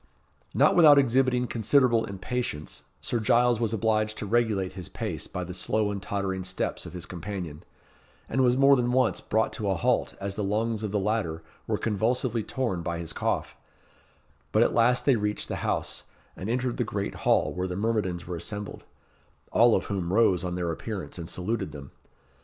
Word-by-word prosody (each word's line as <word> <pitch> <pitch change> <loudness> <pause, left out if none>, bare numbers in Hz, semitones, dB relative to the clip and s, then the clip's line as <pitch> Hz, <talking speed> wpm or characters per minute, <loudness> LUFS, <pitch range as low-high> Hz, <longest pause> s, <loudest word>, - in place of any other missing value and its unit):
Not - - +5
without 155 -4 +8
exhibiting 130 -1 +3
considerable 120 0 +3
impatience, 100 -5 -4 0.2
Sir 120 - -1
Giles 120 +1 +3
was 115 -3 0
obliged 110 -1 0
to - - -4
regulate 105 -4 +1
his 90 -3 -7
pace - - -4
by 90 - -4
the 90 +1 -6
slow 105 +3 0
and 100 -1 -4
tottering 95 -2 -2
steps 95 0 -3
of - - -10
his 90 -2 -5
companion, 90 -4 -6 0.7
and 130 - 0
was 125 0 +3
more 140 +1 +6
than 125 -1 0
once 130 -2 +2
brought 110 +1 0
to 105 -2 -2
a 95 - +2
halt 85 - 0
as 100 0 -3
the 105 - -3
lungs 110 +2 0
of 105 - -2
the 105 - 0
latter 95 -6 -1 0.2
were - - 0
convulsively 115 +2 0
torn 110 -5 -2
by 85 0 -3
his 85 -1 -5
cough, - - -2 1.0
but - - +5
at - - +1
last 125 +2 +3
they 135 -4 +4
reached 105 0 -2
the - - -2
house, - - -2 0.3
and 95 - -5
entered 125 0 -1
the 120 - +1
great 100 -2 -3
hall, - - +1
where 90 +1 -2
the 90 - -4
myrmidons 100 -4 -1
were 90 - -4
assembled 105 +4 -6 0.7
all 115 +1 +5
of - - -1
whom 95 -3 -2
rose 95 -4 +3
on 90 -1 -2
their 85 -2 -1
appearance, 95 +2 -5
and 85 0 -6
saluted 100 +7 -2
them. 70 -2 -9
105 Hz, 185 wpm, -27 LUFS, 95-120 Hz, 1.0 s, without